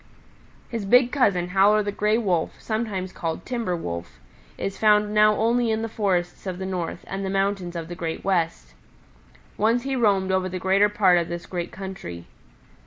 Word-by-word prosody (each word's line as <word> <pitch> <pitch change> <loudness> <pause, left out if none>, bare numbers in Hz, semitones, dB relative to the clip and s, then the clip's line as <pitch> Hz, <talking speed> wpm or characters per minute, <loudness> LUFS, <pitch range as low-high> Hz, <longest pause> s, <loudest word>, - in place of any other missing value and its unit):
"His 230 -3 -4
big 245 +4 +5
cousin, 190 -10 +2
Howler 200 +3 +4
the 205 - -2
Gray 210 +2 +1
Wolf, 185 -8 -1
sometimes 210 -5 -3
called 165 -2 -4
Timber 235 -8 -2
Wolf 85 - -6 0.4
is 195 - -4
found 210 -1 +4
now 215 0 +5
only 235 +2 +2
in 220 0 0
the - - -1
forests 190 -4 -1
of 185 -1 -3
the 190 - -5
North 180 -3 -4
and 195 +1 -5
the 190 - -2
mountains 195 -2 -1
of 165 -1 -4
the 175 - -6
Great 165 -2 -4
West. 165 - -1 0.8
Once 230 +3 +2
he 270 0 -2
roamed 200 -6 +2
over 190 0 +1
the 185 - -4
greater 195 +3 +3
part 190 -4 +4
of 170 - -2
this 170 0 -5
great 175 -2 -4
country. 185 - -7
195 Hz, 180 wpm, -24 LUFS, 175-215 Hz, 0.8 s, big